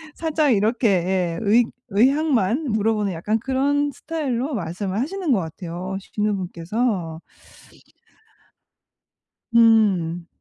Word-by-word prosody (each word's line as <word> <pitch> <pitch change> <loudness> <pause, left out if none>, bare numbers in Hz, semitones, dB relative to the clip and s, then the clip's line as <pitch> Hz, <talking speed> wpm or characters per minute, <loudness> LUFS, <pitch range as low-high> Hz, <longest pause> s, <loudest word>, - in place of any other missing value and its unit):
살짝 310 -5 +1
이렇게 225 +4 +1
예, 180 -2 0
의 225 +3 +4 0.2
의향만 260 +2 +2
물어보는 210 -2 0
약간 210 +7 -1
그런 280 +3 0
스타일로 275 -2 -3
말씀을 190 +2 -3
하시는 345 +3 -2
것 230 - +4
같아요, 175 +3 -5
시누분께서. 190 -2 -2 2.3
음. 195 -8 +3
215 Hz, 220 characters per minute, -22 LUFS, 185-260 Hz, 2.3 s, 의